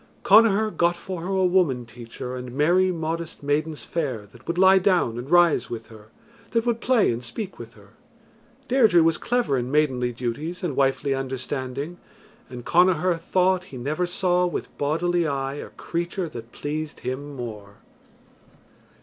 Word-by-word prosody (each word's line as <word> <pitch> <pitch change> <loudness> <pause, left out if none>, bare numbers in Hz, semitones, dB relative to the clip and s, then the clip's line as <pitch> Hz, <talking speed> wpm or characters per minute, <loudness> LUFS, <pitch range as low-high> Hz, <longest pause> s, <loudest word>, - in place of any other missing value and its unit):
Connachar 215 +1 +5
got 170 0 +2
for 180 -1 -6
her 175 - -5
a 190 -1 +1
woman 170 -10 +2
teacher 120 +2 -8
and 125 -1 -7
merry 175 +7 +3
modest 165 -2 -4
maidens 150 +2 -1
fair 130 -11 -3
that 120 +2 -18
would 170 - -2
lie 190 +1 +6
down 180 - +2
and 125 +3 -7
rise 170 -7 +4
with 115 -1 -7
her, 110 -2 -14 0.4
that 230 0 0
would 235 -1 0
play 250 - +3
and 120 +1 -4
speak 185 - -6
with 115 -1 -10
her. 100 -2 -18 0.8
Deirdre 220 -10 +5
was 165 0 +2
clever 240 - 0
in 120 +1 -3
maidenly 130 -4 +1
duties 130 +10 -4
and 160 -7 -2
wifely 135 0 +1
understanding, 135 +4 -4 0.5
and 125 -2 -9
Connachar 180 0 +3
thought 185 +1 +1
he 135 - -10
never 150 +8 -1
saw 180 0 +1
with 175 - -5
bodily 170 +3 +1
eye 135 -1 -2
a - - -7
creature 175 +2 -3
that 120 -6 -9
pleased 150 +1 -5
him 140 +3 -5
more. 105 -5 -7
155 Hz, 160 wpm, -24 LUFS, 130-180 Hz, 0.8 s, lie